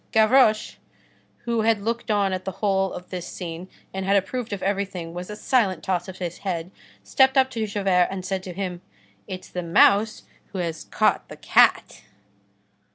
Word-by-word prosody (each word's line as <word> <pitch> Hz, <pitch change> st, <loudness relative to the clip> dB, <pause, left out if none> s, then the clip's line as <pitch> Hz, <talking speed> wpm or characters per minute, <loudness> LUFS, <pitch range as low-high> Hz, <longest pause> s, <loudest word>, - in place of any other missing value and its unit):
Gavroche, 220 Hz, 0 st, +4 dB, 0.7 s
who 235 Hz, -1 st, 0 dB
had 220 Hz, -2 st, +2 dB
looked 230 Hz, +1 st, -3 dB
on 200 Hz, -2 st, +2 dB
at 185 Hz, 0 st, -3 dB
the 190 Hz, -, -4 dB
whole 195 Hz, -2 st, 0 dB
of 180 Hz, -, -9 dB
this 180 Hz, -2 st, -5 dB
scene 175 Hz, +1 st, -7 dB, 0.2 s
and 190 Hz, 0 st, -3 dB
had 195 Hz, +1 st, +2 dB
approved 235 Hz, +4 st, -3 dB
of 200 Hz, -, -4 dB
everything 190 Hz, -4 st, -2 dB
with 180 Hz, +2 st, -6 dB
a 210 Hz, -, -5 dB
silent 210 Hz, -, +1 dB
toss 185 Hz, -1 st, -1 dB
of 190 Hz, -1 st, -8 dB
his 175 Hz, -2 st, -5 dB
head, 180 Hz, -2 st, -4 dB, 0.3 s
stepped 265 Hz, 0 st, +3 dB
up 265 Hz, 0 st, +4 dB
to 225 Hz, -3 st, -2 dB
Javert 195 Hz, -3 st, +2 dB
and 190 Hz, -1 st, -5 dB
said 190 Hz, 0 st, -2 dB
to 185 Hz, -1 st, -8 dB
him:— 180 Hz, -1 st, -4 dB, 0.5 s
"It's 185 Hz, 0 st, -7 dB
the 180 Hz, -, -4 dB
mouse 200 Hz, +5 st, +3 dB, 0.3 s
who -, -, -4 dB
has 170 Hz, -3 st, -3 dB
caught -, -, +1 dB
the -, -, -10 dB
cat." -, -, +3 dB
195 Hz, 180 wpm, -24 LUFS, 180-215 Hz, 0.7 s, Gavroche